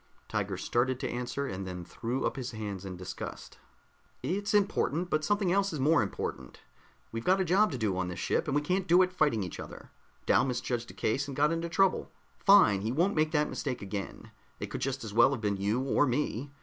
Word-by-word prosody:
Tiger - - -2
started 125 +1 0
to - - -2
answer, 125 +3 -3
and 95 -5 -5
then 90 -1 -6
threw 120 +8 -3
up - - -1
his 125 -2 -5
hands 100 -3 -5
in 90 -2 -6
disgust. 90 0 -8 0.6
"It's 200 +3 -1
important 180 -4 +1
but 155 0 +1
something 205 +1 +1
else 195 -1 +1
is 150 - -3
more 150 +5 +4
important. 100 - -5 0.5
We've 115 0 -4
got 190 +2 +3
a 190 - +1
job 190 +4 +3
to 135 - -3
do 105 -5 0
on 95 0 -1
this 90 0 -5
ship, - - 0
and 140 - 0
we 145 - +2
can't 185 +4 0
do 180 +2 +6
it 185 0 -2
fighting 145 - +2
each 90 - -7
other. - - -9 0.3
Dal - - +4
misjudged 120 -2 -2
a - - -11
case 135 +6 0
and 140 - -6
got 150 +2 +3
in 165 0 -1
trouble. 185 +3 +2 0.3
Fine, 190 - +6
he 110 +3 -1
won't 175 +10 +2
make 155 0 +2
that 150 -1 +2
mistake 125 -4 -3
again. 100 0 -6 0.3
It - - -5
could - - -4
just 135 -1 -2
as 105 -2 -6
well 120 +5 +5
have 125 - -4
been 100 -2 0
you, 100 +5 0
or 135 +2 +2
me. 130 0 -1
135 Hz, 225 wpm, -30 LUFS, 110-165 Hz, 0.6 s, do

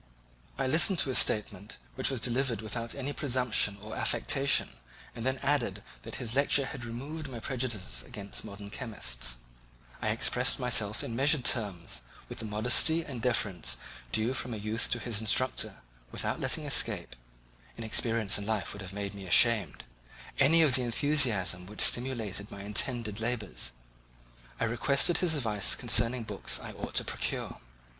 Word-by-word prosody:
I 135 - -1
listened 160 +7 +4
to 145 - +3
his 130 - +3
statement, 105 -1 0 0.2
which 130 - +2
was 135 -3 -1
delivered 125 -1 0
without 115 +2 -4
any 140 +1 -4
presumption 125 -7 +1
or 110 +1 -7
affectation, 140 0 +1 0.4
and 115 - -6
then 130 +1 0
added 120 -9 0 0.2
that - - -8
his 120 -1 -2
lecture 140 0 +4
had 130 -3 -7
removed 140 +6 -6
my 120 -3 -7
prejudices 115 - -2
against 100 +10 -6
modern 100 -1 -10
chemists; 65 - -3 0.7
I 110 - -1
expressed 125 +4 +3
myself 110 -4 +1
in 115 - -5
measured 135 +1 +3
terms, 100 - 0 0.3
with - - -8
the 115 - -5
modesty 125 +10 +3
and 130 -5 -7
deference 100 - 0 0.3
due 110 - 0
from 125 -3 -3
a - - -5
youth 110 +2 -2
to - - 0
his 115 -3 -2
instructor, 130 +4 +1 0.3
without - - -3
letting - - -1
escape - - +2 0.6
(inexperience 115 -2 +1
in 100 - -6
life 110 -4 -2
would 100 - -9
have 95 0 -8
made 100 0 -4
me 100 -2 -9
ashamed) 115 +4 +4 0.6
any 160 +4 +6
of 145 -4 +3
the 130 - +4
enthusiasm 120 -8 +1
which 105 +1 -3
stimulated 115 -5 0
my 100 -1 -9
intended 105 +1 0
labours. 105 - -2 0.9
I - - +1
requested 140 +8 +2
his 170 -3 +1
advice 110 -7 +2
concerning 120 +1 +1
the - - -7
books - - 0
I - - -8
ought - - -7
to - - +3
procure. - - -3
115 Hz, 160 wpm, -30 LUFS, 105-130 Hz, 0.9 s, any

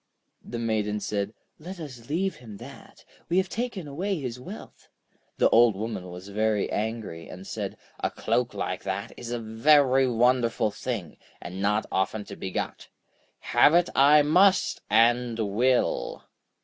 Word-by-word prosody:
The 120 - -6
Maiden 110 -2 -1
said: 100 0 -2 0.3
'Let 180 +4 -8
us 130 -7 -9
leave 185 +5 -1
him 110 -5 -11
that; - - -13 0.2
we 175 - +2
have 190 0 +2
taken 225 -8 -4
away 180 +6 -2
his 125 -3 -5
wealth.' 125 - -11 0.5
The - - +5
Old 115 -2 +6
Woman 100 -3 -5
was 90 +3 -9
very 105 0 0
angry, 105 -6 -4
and 90 +1 -9
said: - - -5 0.2
'A - - 0
cloak - - -1
like - - -3
that 95 0 -4
is 120 - -8
a 120 - -2
very 130 +4 +4
wonderful 120 -2 +2
thing, 100 -8 -5 0.2
and 90 +2 -7
not 105 +2 +1
often 95 +3 -1
to - - -9
be 95 - -5
got. - - -4 0.7
Have 150 - +6
it 175 0 +4
I 145 +2 +6
must, 185 +6 +3
and 115 +2 +3
will!' 115 +4 0
115 Hz, 155 wpm, -26 LUFS, 105-145 Hz, 0.7 s, Old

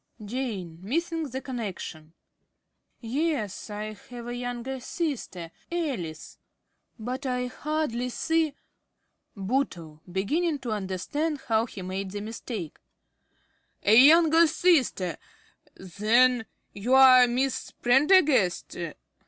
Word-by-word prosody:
~Jane~ 205 -8 -4
(missing 325 - -2
the 260 +2 -5
connection). 190 - -6 0.9
Yes, 240 - -2
I 210 +1 -5 0.2
have 240 -1 -8
a 240 - -5
younger 245 +2 -4
sister, 250 - -4 0.2
Alice. 245 - -4 0.6
(Coldly.) 220 - -10
But 255 +4 -4
I 250 0 -1
hardly 255 -2 -2
see 320 +3 0 0.8
~Bootle~ 190 - -2
(beginning 295 - 0
to 250 -4 -5
understand 215 - -2
how 225 +1 +2
he 190 - -8
made 190 +1 -4
the 205 +2 -5
mistake). 215 - -6 1.0
A 210 - +5
younger 325 +5 +7
sister! 300 - +2 0.6
Then 225 +6 +2 0.3
you 235 +6 +1
are 255 -2 +8
Miss 255 +2 -1
Prendergast? 265 - +3
245 Hz, 105 wpm, -27 LUFS, 200-285 Hz, 1.0 s, are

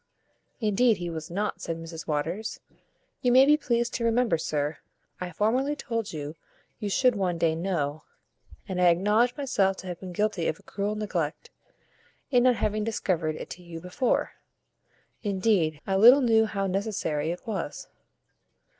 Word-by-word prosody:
"Indeed 220 0 +3
he 175 -1 -4
was 160 -1 -6
not," 205 +4 -2
said 165 -1 -3
Mrs 165 0 -8
Waters. 165 +8 -2 0.6
"You 250 - +2
may 260 +2 +7
be 295 +2 +6
pleased 235 -5 0
to 235 - -2
remember, 230 -4 +2
sir, 150 -1 -2 0.4
I 180 -1 -4
formerly 250 - +1
told 230 -6 -3
you, 150 -1 -5 0.5
you 210 -3 -3
should 250 +4 +3
one 185 -4 0
day 165 -1 +2
know; 160 -4 -2 0.7
and 180 -1 -2
I 180 - +6
acknowledge 210 - +3
myself 205 -9 +1
to 190 - -9
have 175 - -5
been 185 -1 -7
guilty 200 -2 0
of 160 - -1
a - - -21
cruel 205 +1 -3
neglect, 175 -8 -3 0.8
in 245 -2 +5
not 250 0 +4
having 215 -1 -1
discovered 180 -8 -1
it - - -8
to 180 - -8
you 170 -2 -8
before. 180 +9 0 0.9
Indeed, 190 -6 +1
I 195 - 0
little 245 +7 +8
knew 225 -3 +4
how 200 -2 -2
necessary 190 -6 -1
it 175 - -5
was." 195 -9 -4
195 Hz, 165 wpm, -27 LUFS, 165-225 Hz, 0.9 s, little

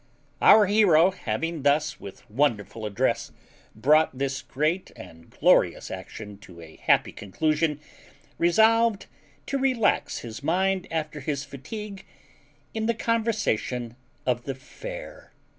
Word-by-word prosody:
Our 215 -1 +8
hero 190 -4 +5
having 165 -3 -3
thus, 150 +2 +1
with 100 - -11
wonderful 110 -4 -1
address, 100 -1 -1 0.4
brought 150 +5 +3
this 135 0 -2
great 155 +8 -1
and 80 0 -13
glorious - - +2
action 105 -2 -8
to 90 -5 -14
a 80 -1 -13
happy - - +2
conclusion, 150 - -1 0.6
resolved 220 +4 +3 0.4
to 275 - -2
relax 255 -5 +1
his 115 +1 -8
mind 185 +5 0
after 155 -2 -3
his 145 0 -3
fatigue, 200 - -8 0.7
in 220 0 -2
the 235 - +1
conversation 215 - -1 0.3
of 120 -1 -1
the 135 - -3
fair. - - -10
155 Hz, 120 wpm, -26 LUFS, 125-200 Hz, 0.7 s, Our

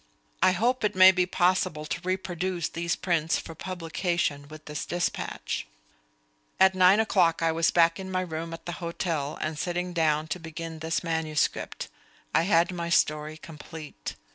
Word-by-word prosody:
I 185 - +5
hope 240 +7 +1
it 210 -2 +1
may 185 0 +9
be 180 -1 +1
possible 180 -3 +1
to 170 - -4
reproduce 185 -2 -2
these 170 +1 -1
prints 165 -3 0
for 165 - -7
publication 170 -4 -2
with 155 +1 -12
this 150 0 -4
despatch. 175 - -2 0.9
At 190 0 +6
nine 185 +2 +6
o'clock 170 -7 +2
I 165 - +3
was 165 +1 +2
back 165 0 +3
in 190 0 -6
my 185 0 0
room 165 -2 -5
at 165 0 -8
the 175 - -3
hotel 165 -4 -2
and 155 -1 -3
sitting 175 +1 -2
down 155 -2 +2
to 180 - -2
begin 165 0 -7
this 160 +2 -1
manuscript. 160 -2 -1 0.5
I - - +4
had 170 0 +4
my 170 -1 -4
story 155 -1 +1
complete. 155 - -9
170 Hz, 165 wpm, -27 LUFS, 160-180 Hz, 0.9 s, may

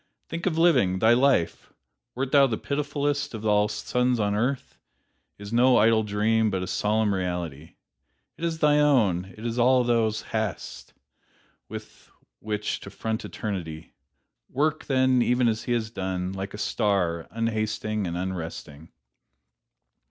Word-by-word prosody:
Think 170 +2 -4
of 165 -3 0
living! 130 - +4
Thy 110 +4 +5
life, 130 -8 +1 0.4
wert 130 +1 -2
thou 140 -2 +6
the 110 -4 -2
pitifullest 145 -1 -2
of 110 0 -7
all 105 -1 +3
the 105 - -5
sons 125 +2 0
of 100 -1 +1
earth, 125 +6 -2 0.6
is 100 +2 -8
no 125 +2 +5
idle 110 +1 +4
dream, 110 +1 +1
but 95 -2 -2
a - - -2
solemn 105 +2 +1
reality. 90 -5 -4 0.6
It - - -11
is 165 -1 -1
thine 150 -1 +4
own; 110 -12 +3
it 110 - -9
is 120 +1 -2
all 125 +1 +4
thou 115 -2 +2
hast 110 -4 -5 0.8
with - - -10 0.3
which 105 0 -3
to - - -10
front 110 0 -4
eternity. 80 -7 -6 0.6
Work, 150 +4 0
then, 130 -2 +3
even 125 0 +2
as 110 -1 -1
he - - -3
has 110 -2 -2
done 95 -3 -3
like 95 +1 -5
a - - -7
star, 90 -6 0
unhasting 110 -2 -2
and 85 0 -3
unresting." 85 -4 -6
110 Hz, 150 wpm, -26 LUFS, 95-125 Hz, 0.8 s, thou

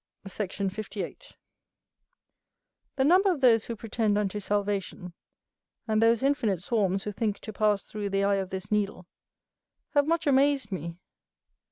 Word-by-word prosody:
Sect. 195 0 -4
58. 205 - -5 1.6
The 265 - +2
number 370 +7 +5
of 335 - -2
those 230 -4 +5
who 235 - -4
pretend 220 -1 0
unto 210 0 -1
salvation, 200 -3 -2 0.7
and 215 0 +2
those 230 +1 +4
infinite 230 -10 +1
swarms 195 -4 0
who 210 - -3
think 210 0 -1
to 215 - -7
pass 210 -1 +1
through 210 -1 -5
the 195 0 0
eye 200 0 +2
of 190 -1 -3
this 190 +1 -6
needle, 205 -3 -1 0.9
have 290 -1 +3
much 335 0 +1
amazed 280 -2 +3
me. 170 -2 -5
210 Hz, 145 wpm, -28 LUFS, 195-235 Hz, 1.6 s, number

